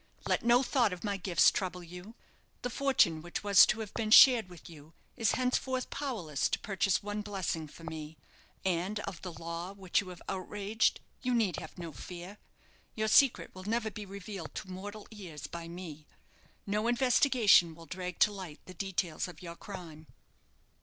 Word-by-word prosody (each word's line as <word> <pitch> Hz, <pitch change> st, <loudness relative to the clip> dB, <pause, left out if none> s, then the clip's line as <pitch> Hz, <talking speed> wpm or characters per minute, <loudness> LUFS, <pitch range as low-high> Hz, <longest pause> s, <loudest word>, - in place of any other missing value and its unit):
Let -, -, +1 dB
no 240 Hz, +2 st, +5 dB
thought 240 Hz, -6 st, +2 dB
of 180 Hz, -, -8 dB
my 205 Hz, -2 st, -1 dB
gifts 180 Hz, -3 st, +4 dB
trouble 180 Hz, -2 st, -3 dB
you. 180 Hz, +6 st, -10 dB, 0.5 s
The 245 Hz, -, -2 dB
fortune 245 Hz, -, +2 dB
which 175 Hz, +5 st, -5 dB
was 200 Hz, -2 st, +8 dB
to 220 Hz, -, 0 dB
have 210 Hz, -2 st, -7 dB
been 220 Hz, -2 st, -2 dB
shared 230 Hz, -3 st, +8 dB
with 175 Hz, -3 st, -13 dB
you 155 Hz, -1 st, -14 dB, 0.2 s
is 225 Hz, -5 st, +2 dB
henceforth 255 Hz, 0 st, -1 dB
powerless 210 Hz, -, -2 dB
to -, -, 0 dB
purchase 195 Hz, -1 st, 0 dB
one 205 Hz, +1 st, -3 dB
blessing 190 Hz, -6 st, -3 dB
for 165 Hz, -, -14 dB
me. 160 Hz, -1 st, -7 dB, 0.5 s
And 190 Hz, +3 st, 0 dB
of 180 Hz, -4 st, -6 dB
the 180 Hz, -, -6 dB
law 170 Hz, +3 st, -6 dB
which 195 Hz, -2 st, 0 dB
you 195 Hz, -, -9 dB
have 180 Hz, -2 st, -10 dB
outraged 205 Hz, +3 st, 0 dB, 0.2 s
you 250 Hz, -2 st, 0 dB
need 210 Hz, -8 st, +1 dB
have 160 Hz, -, -9 dB
no 170 Hz, -3 st, -7 dB
few; 180 Hz, +9 st, -9 dB, 0.6 s
your 220 Hz, 0 st, 0 dB
secret 275 Hz, +2 st, +4 dB
will 185 Hz, 0 st, -10 dB
never 220 Hz, 0 st, -1 dB
be 205 Hz, 0 st, -8 dB
revealed 195 Hz, -3 st, -8 dB
to 190 Hz, -, -6 dB
mortal 205 Hz, +3 st, -8 dB
ears 180 Hz, -9 st, -8 dB
by 170 Hz, -1 st, -7 dB
me. 165 Hz, -3 st, -9 dB, 0.6 s
No 210 Hz, +3 st, 0 dB
investigation 240 Hz, -, +4 dB
will 165 Hz, 0 st, -13 dB
drag 180 Hz, +1 st, -5 dB
to 210 Hz, -, +6 dB
light 185 Hz, -7 st, -8 dB
the 185 Hz, -, -10 dB
details 185 Hz, -2 st, -2 dB
of 180 Hz, -, -12 dB
your 170 Hz, -1 st, -7 dB
crime." 170 Hz, -6 st, -10 dB
190 Hz, 180 wpm, -31 LUFS, 170-215 Hz, 0.6 s, was